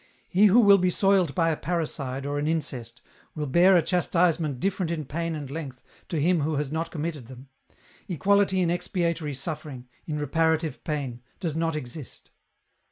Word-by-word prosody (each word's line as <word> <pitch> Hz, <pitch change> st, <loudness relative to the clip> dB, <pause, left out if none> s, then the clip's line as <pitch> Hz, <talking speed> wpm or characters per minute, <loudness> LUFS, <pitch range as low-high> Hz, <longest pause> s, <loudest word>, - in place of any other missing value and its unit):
He 200 Hz, +4 st, +5 dB
who 210 Hz, +5 st, +6 dB
will 200 Hz, -2 st, +7 dB
be 180 Hz, 0 st, +2 dB
soiled 190 Hz, -4 st, +2 dB
by 165 Hz, -2 st, +2 dB
a -, -, 0 dB
parricide 145 Hz, -5 st, -3 dB
or 145 Hz, 0 st, -2 dB
an 145 Hz, -, -1 dB
incest 125 Hz, -7 st, -3 dB, 0.3 s
will 150 Hz, -1 st, -2 dB
bear 175 Hz, +6 st, +5 dB
a 170 Hz, -, +3 dB
chastisement 170 Hz, -6 st, +1 dB
different 190 Hz, -1 st, -1 dB
in 160 Hz, -3 st, -3 dB
pain 165 Hz, +4 st, -3 dB
and 145 Hz, -3 st, -6 dB
length 140 Hz, -5 st, -7 dB, 0.3 s
to 165 Hz, -, -1 dB
him 175 Hz, +3 st, +3 dB
who 155 Hz, +2 st, 0 dB
has 145 Hz, -1 st, -2 dB
not 165 Hz, +1 st, -2 dB
committed 155 Hz, -6 st, -5 dB
them; 130 Hz, +1 st, -12 dB, 0.6 s
equality 195 Hz, +1 st, +2 dB
in 170 Hz, -2 st, +2 dB
expiatory 170 Hz, -4 st, -1 dB
suffering, 140 Hz, -3 st, -6 dB, 0.2 s
in 150 Hz, -2 st, -2 dB
reparative 160 Hz, -1 st, 0 dB
pain, 135 Hz, -6 st, -3 dB, 0.2 s
does 165 Hz, -5 st, -3 dB
not 165 Hz, -1 st, 0 dB
exist. 130 Hz, -2 st, -8 dB
160 Hz, 170 wpm, -26 LUFS, 145-175 Hz, 0.6 s, will